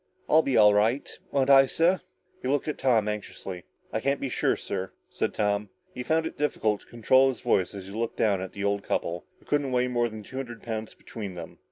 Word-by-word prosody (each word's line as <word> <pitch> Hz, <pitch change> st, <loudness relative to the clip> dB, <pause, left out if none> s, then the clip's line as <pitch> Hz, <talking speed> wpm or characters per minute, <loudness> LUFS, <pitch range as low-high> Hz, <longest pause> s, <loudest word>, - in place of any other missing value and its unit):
I'll 155 Hz, -, +6 dB
be 135 Hz, -4 st, +1 dB
all 105 Hz, -1 st, +7 dB
right. 110 Hz, +7 st, +2 dB, 0.2 s
Won't 140 Hz, 0 st, +3 dB
I, 135 Hz, 0 st, +8 dB
sir?" 170 Hz, +7 st, +2 dB, 0.4 s
He -, -, -4 dB
looked 145 Hz, +2 st, 0 dB
at 150 Hz, -, -3 dB
Tom 115 Hz, -5 st, +3 dB
anxiously. 100 Hz, -3 st, -5 dB, 0.3 s
"I -, -, +1 dB
can't 140 Hz, 0 st, 0 dB
be 135 Hz, -, -3 dB
sure, -, -, +1 dB
sir," 95 Hz, 0 st, -4 dB, 0.2 s
said -, -, -1 dB
Tom. 105 Hz, 0 st, 0 dB, 0.2 s
He 125 Hz, -, -5 dB
found 160 Hz, +5 st, +1 dB
it 160 Hz, -, -6 dB
difficult 110 Hz, -8 st, 0 dB
to -, -, -21 dB
control 130 Hz, +3 st, +4 dB
his 130 Hz, -, -5 dB
voice 95 Hz, +2 st, +1 dB
as 95 Hz, -2 st, -7 dB
he 95 Hz, -, -10 dB
looked 115 Hz, +2 st, -3 dB
down 100 Hz, -4 st, +2 dB
at 95 Hz, -, -6 dB
the 100 Hz, -, -5 dB
old 100 Hz, 0 st, +1 dB
couple, 85 Hz, -2 st, -2 dB
who -, -, -25 dB
couldn't 145 Hz, -2 st, 0 dB
weigh 125 Hz, 0 st, +2 dB
more 120 Hz, -1 st, +1 dB
than 110 Hz, -1 st, -8 dB
two 130 Hz, -, -9 dB
hundred 120 Hz, -4 st, -6 dB
pounds 110 Hz, -1 st, -5 dB
between 100 Hz, -5 st, -7 dB
them. 85 Hz, -2 st, -9 dB
115 Hz, 230 wpm, -27 LUFS, 105-135 Hz, 0.4 s, I